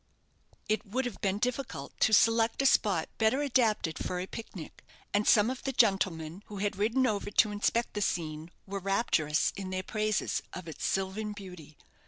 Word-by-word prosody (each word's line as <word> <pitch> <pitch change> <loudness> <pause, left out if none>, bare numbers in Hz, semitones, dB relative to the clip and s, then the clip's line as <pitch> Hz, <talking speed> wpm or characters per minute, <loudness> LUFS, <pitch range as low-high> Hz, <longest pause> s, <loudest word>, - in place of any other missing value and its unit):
It 215 0 0
would 250 +6 -2
have 245 - -6
been 195 0 +1
difficult 245 - -3
to - - +4
select 225 +3 +4
a - - 0
spot 195 -10 +3
better 235 +6 +3
adapted 220 - +1
for 180 - -3
a 180 - -3
pic 225 +3 -9
nic; 165 -5 -9 0.3
and 205 +1 +2
some 220 +2 +5
of 260 - -6
the 270 - -2
gentlemen 190 -7 +1
who 205 - -8
had 205 +1 -1
ridden 230 +6 +2
over 205 -4 -1
to 210 +1 +3
inspect 230 +3 0
the 210 - -2
scene 160 -4 -2 0.2
were 200 0 -4
rapturous 180 -6 +1
in 195 -2 -5
their 185 0 -3
praises 215 +1 -1
of 185 -2 -7
its 160 - -5
sylvan 195 +3 -2
beauty. 180 -7 -11
205 Hz, 185 wpm, -30 LUFS, 185-225 Hz, 0.3 s, some